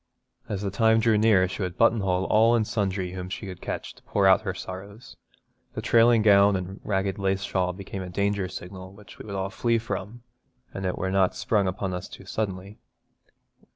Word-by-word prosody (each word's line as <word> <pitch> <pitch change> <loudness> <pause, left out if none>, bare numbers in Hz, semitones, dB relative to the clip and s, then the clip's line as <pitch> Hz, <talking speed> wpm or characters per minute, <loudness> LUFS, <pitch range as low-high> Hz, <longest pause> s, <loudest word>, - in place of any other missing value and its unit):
As 100 -1 -3
the 100 - -2
time 110 +2 +3
drew 110 0 +3
near 105 -3 +4
she 95 - -6
would 90 -2 -3
buttonhole 100 -5 +2
all 115 +4 +4
and 110 -2 +1
sundry 95 -4 -2
whom 90 0 -6
she 100 - -6
could 95 -2 -8
catch - - -5
to - - -21
pour 100 -1 0
out 95 +2 +6
her 95 -4 -4
sorrows. 100 +6 -9 0.6
The - - -3
trailing 115 -1 +5
gown 100 -1 +6
and 95 +2 -5
ragged 95 -1 -1
lace 95 0 0
shawl 90 -2 0
became 95 +1 -7
a 90 - -6
danger 100 +1 -1
signal 95 +1 -9
which 100 0 -15
we - - -9
would 100 - -5
all 95 0 -2
flee 115 +2 +1
from, 110 +1 -5 0.5
an 95 - -5
it 90 - -1
were 95 +2 -2
not 95 -1 +2
sprung 105 -3 +1
upon 95 0 -3
us 90 +1 -5
too 95 - -12
suddenly. 100 0 -4
100 Hz, 200 wpm, -26 LUFS, 95-105 Hz, 0.6 s, out